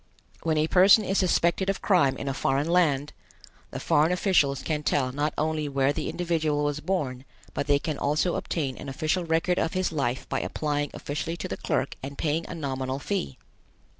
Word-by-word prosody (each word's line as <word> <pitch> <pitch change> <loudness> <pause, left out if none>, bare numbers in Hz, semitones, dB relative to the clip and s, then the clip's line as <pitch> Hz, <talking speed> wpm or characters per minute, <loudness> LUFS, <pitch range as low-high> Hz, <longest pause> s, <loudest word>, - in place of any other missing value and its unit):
When 160 -2 0
a 155 - +3
person 195 +6 +6
is 195 - +1
suspected 180 +1 +2
of 195 - -2
crime 175 -9 +3
in 140 - -5
a 135 - 0
foreign 135 +2 0
land, 150 -5 +2 0.6
the - - -6
foreign 155 +3 +3
officials 175 -7 +2
can 150 -2 -1
tell 135 -3 +1
not 145 +3 -1
only 155 -1 -1
where 140 0 +1
the - - -3
individual 160 -4 0
was 145 0 -1
born, 145 -8 -2 0.3
but - - -2
they 145 -1 +4
can 150 0 -4
also 155 +5 +1
obtain 140 -6 -2
an 140 - -7
official 155 +6 -1
record 165 +2 +1
of 165 - -1
his 185 -2 0
life 135 -5 -2
by - - -1
applying 145 -1 -2
officially 155 +3 -4
to - - -4
the - - -4
clerk - - -2
and 140 +1 -7
paying 160 +1 -1
a - - -5
nominal 135 -3 -3
fee. 145 - -3
150 Hz, 195 wpm, -26 LUFS, 140-170 Hz, 0.6 s, person